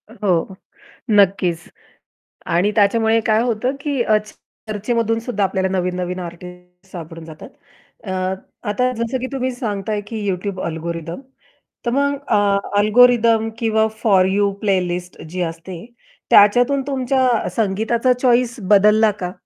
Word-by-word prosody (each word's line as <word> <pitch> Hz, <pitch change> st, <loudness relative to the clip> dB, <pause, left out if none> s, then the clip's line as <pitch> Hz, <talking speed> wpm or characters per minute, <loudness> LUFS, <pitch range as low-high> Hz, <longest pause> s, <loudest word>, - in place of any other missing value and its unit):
हो, 195 Hz, -5 st, -1 dB, 0.6 s
नक्कीच. 190 Hz, -5 st, +2 dB, 0.8 s
आणि 180 Hz, +5 st, +1 dB
त्याच्यामुळे 220 Hz, +2 st, +3 dB
काय 220 Hz, 0 st, +3 dB
होतं, 245 Hz, +3 st, -1 dB
की 280 Hz, -3 st, -1 dB
अ, 215 Hz, -2 st, +3 dB, 0.5 s
चर्चेमधून 225 Hz, +2 st, -1 dB
सुद्धा 225 Hz, -3 st, -2 dB
आपल्याला 190 Hz, 0 st, 0 dB
नवीन-नवीन 180 Hz, 0 st, -2 dB
आर्टिस्ट 180 Hz, +1 st, -11 dB
सापडून 165 Hz, -2 st, -9 dB
जातात. 155 Hz, -1 st, -11 dB, 0.5 s
अ, 190 Hz, -, -6 dB, 0.6 s
आता 250 Hz, +5 st, +1 dB
जसं 235 Hz, +3 st, -2 dB
की 255 Hz, -, -4 dB
तुम्ही 260 Hz, -1 st, -2 dB
सांगताय, 210 Hz, -4 st, -3 dB
की 220 Hz, 0 st, -5 dB
YouTube 190 Hz, 0 st, -3 dB
अल्गोरिदम. 165 Hz, +3 st, -5 dB, 0.6 s
तर 235 Hz, -, 0 dB
मग 280 Hz, +2 st, +1 dB
अ, 220 Hz, -, +2 dB, 0.4 s
अल्गोरिदम 225 Hz, +1 st, +4 dB
किंवा 220 Hz, -1 st, +2 dB, 0.2 s
फॉर 195 Hz, -4 st, +4 dB
यू 200 Hz, +1 st, +1 dB
प्लेलिस्ट 180 Hz, -3 st, -2 dB
जी 180 Hz, +2 st, -4 dB
असते, 170 Hz, +2 st, -10 dB, 0.4 s
त्याच्यातून 245 Hz, +7 st, +5 dB
तुमच्या 260 Hz, -3 st, +1 dB
संगीताचा 225 Hz, +4 st, +1 dB
चॉइस 245 Hz, -1 st, +2 dB, 0.2 s
बदलला 210 Hz, +2 st, +5 dB
का? 180 Hz, 0 st, -3 dB
210 Hz, 125 wpm, -19 LUFS, 180-235 Hz, 0.8 s, त्याच्यातून